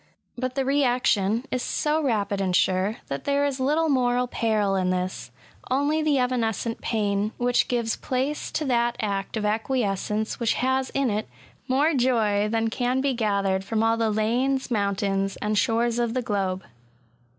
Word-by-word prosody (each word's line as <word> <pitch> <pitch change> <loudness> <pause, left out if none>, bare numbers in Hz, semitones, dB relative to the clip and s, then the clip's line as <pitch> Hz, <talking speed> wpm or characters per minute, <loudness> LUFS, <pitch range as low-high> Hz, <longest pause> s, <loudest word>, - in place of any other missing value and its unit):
But 255 +1 -3
the 270 -1 0
reaction 245 -5 +2
is 255 - -1
so 305 +4 0
rapid 205 -7 0
and 185 -2 0
sure, 190 +5 +1
that 140 - -5
there 285 0 +2
is 280 -2 -2
little 300 +5 +2
moral 250 -3 +2
peril 215 -4 0
in 185 -1 +1
this— 185 0 -2 0.4
only 285 +4 +1
the 305 -2 +2
evanescent 235 -3 -1
pain, 205 -1 0
which 245 0 +2
gives 235 -2 -1
place 270 +4 -2
to 310 - -1
that 240 -2 +1
act 200 -1 -2
of 210 - -2
acquiescence 215 -1 -1
which 235 -2 +1
has 260 +1 0
in 275 -4 +1
it 210 -5 -2 0.4
more 285 +5 +2
joy 220 -6 +2
than 225 0 0
can 250 +2 0
be 275 0 +1
gathered 200 -4 0
from 220 +2 -1
all 225 0 +3
the 225 -1 +1
lanes, 245 +5 0
mountains, 195 -2 0
and 210 +1 -2
shores 230 +2 +1
of 235 0 0
the 255 - 0
globe. 190 -4 -1
230 Hz, 165 wpm, -25 LUFS, 205-260 Hz, 0.4 s, all